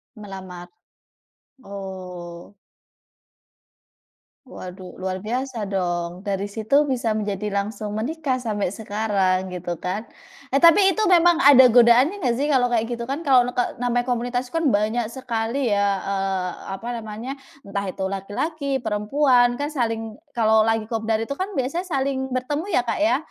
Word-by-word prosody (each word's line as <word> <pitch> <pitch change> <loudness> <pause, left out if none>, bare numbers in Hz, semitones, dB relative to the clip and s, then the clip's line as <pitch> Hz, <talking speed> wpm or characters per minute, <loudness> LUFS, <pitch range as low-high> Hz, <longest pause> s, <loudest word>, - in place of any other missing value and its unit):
Melamar. 190 -4 -9 0.9
Oh. 185 -2 -8 1.9
Waduh, 185 -7 -10
luar 185 0 -2
biasa 245 0 -3
dong. 175 -2 -2
Dari 200 -1 -2
situ 220 +8 +2
bisa 245 -4 0
menjadi 210 0 -3
langsung 205 +1 -3
menikah 275 +3 -1
sampai 210 -6 -2
sekarang, 200 -3 0
gitu 175 -1 -4
kan. 195 +5 -3 0.5
Eh, 275 - +3
tapi 345 +4 +7
itu 435 - 0
memang 345 -1 +6
ada 260 -2 +9
godaannya 245 - +5
nggak 240 -2 +2
sih, 290 - +1
kalau 260 -4 +3
kayak 230 -1 +2
gitu 235 0 -4
kan, 275 +7 -4
kalau 255 -3 +6
neke 245 0 0 0.2
namanya 245 0 +1
komunitas 245 +1 -1
itu 250 - -13
kan, 320 - +2
banyak 220 +3 +1
sekali 240 0 -2
ya, 200 -1 +1
eee, 195 -2 -2 0.3
apa 230 - -8
namanya, 225 +4 -6 0.3
entah 200 0 -3
itu 190 - -5
laki-laki, 275 - -3
perempuan, 245 +3 +2
kan 290 - -1
saling 225 -6 -2 0.2
kalau 220 -3 +3
lagi 225 -1 0
kopdar 225 -1 -1
itu 225 +5 -3
kan 375 +6 -3
biasanya 270 +7 -1
saling 270 -5 -2
bertemu 275 +6 -2
ya, 250 - +3
Kak, 230 - -1
ya. 320 -5 +3
225 Hz, 145 wpm, -23 LUFS, 200-260 Hz, 1.9 s, ada